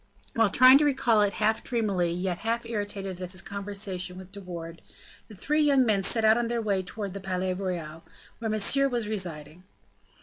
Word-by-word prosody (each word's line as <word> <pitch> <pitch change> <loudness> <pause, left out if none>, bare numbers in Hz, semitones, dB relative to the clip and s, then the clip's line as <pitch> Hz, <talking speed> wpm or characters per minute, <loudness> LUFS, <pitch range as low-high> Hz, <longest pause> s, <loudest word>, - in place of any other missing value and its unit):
While 225 -2 +3
trying 255 +5 +7
to - - +2
recall 265 -6 +2
it 205 -1 +2
half 220 +1 0
dreamily, 205 -8 0
yet 180 0 -2
half 230 +1 -2
irritated 205 -4 -4
at 180 0 -4
his 185 - -3
conversation 195 -2 -4
with 190 0 -11
De 200 0 -9
Wardes, 170 -2 -8 0.5
the 215 - -12
three 300 +10 0
young 280 -3 +4
men 210 -4 +2
set 220 +3 +1
out 220 +2 +5
on 240 - -1
their 235 0 -1
way 200 -4 0
towards 195 +1 -6
the 200 - -6
Palais 185 -1 -2
Royal, 170 -4 -5 0.4
where 225 -1 -3
Monsieur 245 +6 +2
was 240 -4 -2
residing. 175 -6 -5
200 Hz, 195 wpm, -27 LUFS, 185-230 Hz, 0.5 s, trying